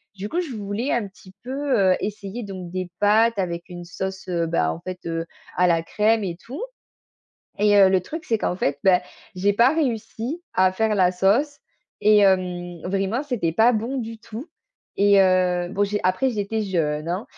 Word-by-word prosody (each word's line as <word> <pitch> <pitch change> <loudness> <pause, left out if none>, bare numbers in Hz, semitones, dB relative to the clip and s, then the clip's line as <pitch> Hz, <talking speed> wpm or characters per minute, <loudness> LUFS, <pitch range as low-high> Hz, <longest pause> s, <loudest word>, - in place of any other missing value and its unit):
du 200 +1 -6
coup, 345 - -1
je 295 -9 -6
voulais 210 +5 -3
un 235 -3 0
petit 190 -1 -17
peu, 270 +2 -1
heu, 190 -1 +4
essayer 210 +2 -5
donc 185 -4 -7
des 185 -1 -4
pâtes 220 +2 +4
avec 170 -2 -3
une 175 -1 -8
sauce, 190 +2 -6
heu, 170 -2 0
ben 80 - +1
en 80 - -6
fait, 185 -1 -6
heu, 165 0 -2 0.3
à 180 0 +4
la 165 -1 +2
crème 215 +5 +1
et 170 -2 -4
tout 275 - -7 1.0
et 205 0 +4
heu, 195 - +7
le 190 -1 +3
truc 320 - -7
c'est 225 - +2
qu'en 180 - -1
fait, 140 -5 -1
bah, 185 -2 +5 0.4
j'ai 200 +3 +2
pas 240 +7 +4
réussi 260 +2 -2
à 185 0 +4
faire 220 +2 +1
la 185 -2 +4
sauce 215 +11 +1 0.4
et 210 0 +6
hem, 180 -3 +1
vraiment 195 +6 -1
c'était 235 - -1
pas 225 +8 +4
bon 235 +4 -2
du 225 -2 -6
tout 225 +5 -9 0.5
et 200 -1 +6
heu, 180 -1 +2
bon 205 +1 +1
j'ai 205 +1 -2
après 185 +8 +2
j'étais 220 0 -2
jeune 160 -5 -1
hein 185 +6 -2
200 Hz, 195 wpm, -23 LUFS, 180-225 Hz, 1.0 s, heu